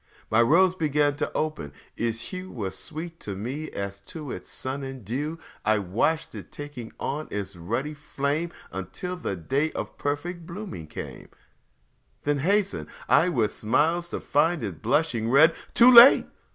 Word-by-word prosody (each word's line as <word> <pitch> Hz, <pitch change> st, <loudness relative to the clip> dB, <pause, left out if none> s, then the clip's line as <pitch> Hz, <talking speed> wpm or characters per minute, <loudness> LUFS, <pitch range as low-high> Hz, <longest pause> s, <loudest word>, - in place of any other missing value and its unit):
My 110 Hz, +2 st, +5 dB
rose 170 Hz, +9 st, +5 dB
began 150 Hz, -4 st, +1 dB
to -, -, -2 dB
open, 155 Hz, -, -2 dB
and 75 Hz, -, -12 dB, 0.2 s
its 115 Hz, 0 st, -1 dB
hue 185 Hz, +5 st, -7 dB
Was 100 Hz, -, -4 dB
sweet 165 Hz, -, -7 dB
to 100 Hz, -, -5 dB
me 130 Hz, +10 st, -4 dB
as 100 Hz, 0 st, -5 dB
to 150 Hz, -1 st, -7 dB
it -, -, -7 dB
sun 130 Hz, +2 st, -4 dB
and 135 Hz, -4 st, -7 dB
dew; 145 Hz, -, -3 dB, 0.3 s
I 110 Hz, 0 st, +3 dB
watched 105 Hz, -, 0 dB
it -, -, -9 dB
taking 145 Hz, -6 st, -8 dB
on 150 Hz, +3 st, -3 dB
its 100 Hz, -2 st, -4 dB
ruddy 115 Hz, -, -3 dB
flame 150 Hz, +2 st, -2 dB, 0.2 s
Until 95 Hz, -, -5 dB
the 165 Hz, -, -3 dB
day 135 Hz, -, 0 dB
of -, -, -6 dB
perfect 165 Hz, +4 st, -3 dB
blooming 175 Hz, -, -7 dB
came, -, -, -8 dB, 0.9 s
Then 145 Hz, 0 st, +1 dB
hasted 200 Hz, +6 st, +1 dB, 0.2 s
I 180 Hz, -, +5 dB
with 115 Hz, -10 st, +1 dB
smiles 165 Hz, +10 st, +1 dB
to -, -, -3 dB
find 155 Hz, 0 st, +1 dB
it 95 Hz, -8 st, -5 dB
blushing 120 Hz, -2 st, +1 dB
red 155 Hz, +6 st, +6 dB, 0.2 s
Too 245 Hz, +2 st, +8 dB
late! 240 Hz, +2 st, +10 dB
145 Hz, 165 wpm, -26 LUFS, 110-165 Hz, 0.9 s, late